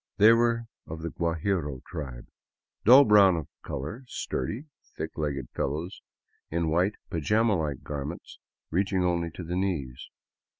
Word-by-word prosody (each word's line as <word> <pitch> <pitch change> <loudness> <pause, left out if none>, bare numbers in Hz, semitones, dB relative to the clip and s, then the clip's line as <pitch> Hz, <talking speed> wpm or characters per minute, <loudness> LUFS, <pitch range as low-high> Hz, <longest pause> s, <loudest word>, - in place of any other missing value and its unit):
They 110 +3 +8
were 115 0 +2 0.2
of 80 0 -7
the 85 - -3
Guajiro 85 -4 -1
tribe, 65 -6 -7 0.6
dull 130 +5 +9
brown 100 -4 +6
of 80 -3 -4 0.2
color, 80 - -5
sturdy, 110 - -3 0.3
thick 80 +1 -5
legged 70 -5 -3
fellows 80 +7 -3 0.5
in 80 -1 0
white 90 +5 +2 0.2
pa 85 - -1
jama 105 +6 +3
like 75 -6 -2
garments 75 +3 -6 0.3
reach 95 +4 +1
ing 95 -2 +2
only 85 -1 0
to 85 +2 -8
the 85 +2 -4
knees. 80 -10 -2
85 Hz, 145 wpm, -28 LUFS, 75-100 Hz, 0.6 s, dull